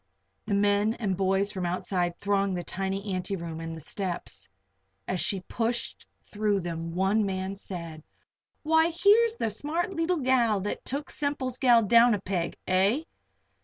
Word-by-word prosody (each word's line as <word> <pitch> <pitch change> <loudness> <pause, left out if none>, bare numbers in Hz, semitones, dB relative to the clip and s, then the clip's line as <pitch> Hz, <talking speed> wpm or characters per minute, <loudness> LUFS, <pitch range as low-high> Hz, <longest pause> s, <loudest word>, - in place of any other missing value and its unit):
The 200 - +1
men 205 +2 +2
and 200 -5 -1
boys 195 +2 +1
from 190 -3 -4
outside 175 -1 -1
thronged 200 -2 0
the 175 - -3
tiny 195 +2 -3
anteroom 170 -3 -4
and 165 0 -5
the - - -9
steps. 175 - -4 0.6
As 185 - -1
she 195 -4 -1
pushed 230 +5 -3 0.2
through 205 -2 0
them 165 -1 -5
one 195 +4 +2
man 190 0 -2
said: 170 -5 -7 0.6
"Why, 320 +1 +4
here's 420 +7 +4
the 225 - -1
smart 320 - -2
leetle 330 -1 0
gal 240 -5 +3
that 205 - -4
took 280 +2 -4
Semple's 270 -4 -2
gal 240 -3 +5
down 230 +2 +6
a - - -4
peg 180 -3 -3
eh? 195 +10 +2
200 Hz, 155 wpm, -28 LUFS, 185-245 Hz, 0.6 s, down